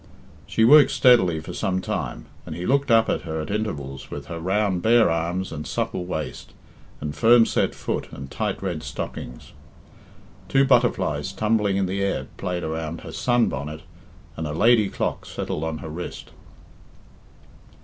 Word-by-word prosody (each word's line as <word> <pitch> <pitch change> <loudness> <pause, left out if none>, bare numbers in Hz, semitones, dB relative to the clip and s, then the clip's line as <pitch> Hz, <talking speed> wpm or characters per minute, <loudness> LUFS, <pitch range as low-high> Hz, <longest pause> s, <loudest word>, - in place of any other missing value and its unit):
She 110 - +1
worked 145 +4 +8
steadily 95 - +4
for - - -8
some 95 -1 -1
time, - - -4 0.2
and - - -7
he 90 - -5
looked 140 +4 +2
up 115 -1 +5
at - - 0
her 80 -1 -4
at 80 - -4
intervals 75 -11 -4
with 70 -1 -7
her 85 +4 -6
round 95 +1 0
bare 115 -2 +5
arms 85 +3 -2
and 75 +1 -6
supple 90 - -2
waist 80 -4 -5 0.5
and 75 0 -5
firm 115 0 +6
set - - 0
foot - - -4
and 65 0 -9
tight - - -3
red - - -2
stocking. - - -6 1.1
Two 135 0 +4
butterflies 115 - +2
tumbling 105 -1 +1
in 100 - +1
the 95 +2 -2
air 100 - -1
played 90 -2 -3
around 80 +1 -4
her - - -9
sun 120 -2 +2
bonnet 75 +3 -5 0.5
and 80 - -4
a 75 - -4
lady 110 +3 +4
clock - - -3
settled 75 - -4
on 80 -1 -2
her - - -6
wrist. 85 +3 -7
90 Hz, 165 wpm, -24 LUFS, 80-110 Hz, 1.1 s, worked